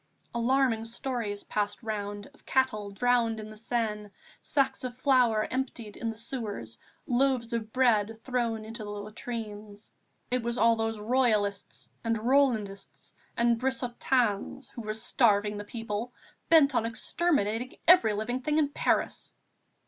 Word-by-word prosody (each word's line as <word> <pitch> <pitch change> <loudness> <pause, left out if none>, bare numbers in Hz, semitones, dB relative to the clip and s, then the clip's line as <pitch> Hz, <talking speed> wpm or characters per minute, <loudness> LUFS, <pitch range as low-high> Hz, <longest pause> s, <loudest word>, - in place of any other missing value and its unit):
Alarming 240 -1 +2
stories 230 -3 -3
passed 205 +2 -2
round 205 -2 -4
of - - -23
cattle 245 -6 +1
drowned 230 +1 +1
in 215 0 -8
the - - -10
Seine, 215 -2 -2 0.3
sacks 275 -3 0
of 250 -1 -5
flour 250 -5 +3
emptied 240 -4 -3
in 230 - -3
the 225 - -6
sewers, 220 - -6 0.3
loaves 250 -2 +1
of 225 -2 -3
bread 225 -4 +2
thrown 235 -4 -1
into 225 0 -6
the 205 - -6
latrines.... 210 0 -7 0.4
It 250 0 +1
was 235 +1 -2
all 230 +1 +5
those 225 0 -1
Royalists, 210 -3 0
and 230 -1 +1
Rolandists, 220 -5 0 0.2
and 235 0 +3
Brissotins, 250 -2 -1
who 235 - -7
were 215 -1 -4
starving 210 -2 +2
the 205 - -5
people, 225 +2 -4 0.4
bent 300 -4 +6
on 230 -2 +1
exterminating 230 -1 0
every 340 -12 +7
living 230 +5 -2
thing 300 +3 0
in 300 -2 +3
Paris! - - 0
230 Hz, 140 wpm, -29 LUFS, 210-250 Hz, 0.4 s, every